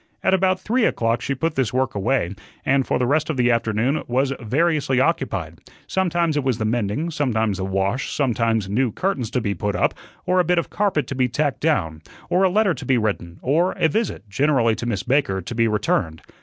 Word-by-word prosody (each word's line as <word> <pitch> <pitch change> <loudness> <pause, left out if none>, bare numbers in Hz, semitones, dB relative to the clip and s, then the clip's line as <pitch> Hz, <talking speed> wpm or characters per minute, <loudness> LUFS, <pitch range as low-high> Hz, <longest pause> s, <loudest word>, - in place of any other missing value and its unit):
At 190 - +3
about 190 0 +2
three 240 +5 0
o'clock 115 0 0
she 140 - -2
put 160 +4 -1
this 130 -6 0
work 130 0 0
away, 100 -2 0 0.3
and 135 0 +2
for - - +1
the 125 - +1
rest 150 +5 +1
of 155 - -2
the 125 -1 +3
afternoon 115 +5 0
was 130 +3 +1
variously 140 +2 +1
occupied 95 - -1 0.3
sometimes 175 -4 0
it 145 - 0
was 130 -4 0
the 110 - -2
mending, 115 +8 -1
sometimes 110 - 0
the 95 - -2
wash, 95 +6 -1
sometimes 115 -6 0
new 115 +4 +1
curtains 135 - -2
to 125 0 -1
be 100 -2 -1
put 105 0 -2
up, - - +1 0.3
or 185 +1 +2
a - - +5
bit 175 +1 +1
of 170 - -1
carpet 195 -8 0
to - - -5
be 130 -1 +1
tacked 145 +3 -1
down, 80 - 0 0.3
or 180 - +3
a 190 - +4
letter 200 0 +2
to 145 - -8
be 130 0 +2
written, 100 -6 -2
or 165 +8 +2
a - - +2
visit 185 - -2
generally 120 +1 +2
to 120 - -4
Miss 105 -6 -2
Baker 130 -8 +1
to 95 +6 -6
be 115 0 +2
returned. 95 -6 -1
130 Hz, 215 wpm, -22 LUFS, 110-155 Hz, 0.3 s, a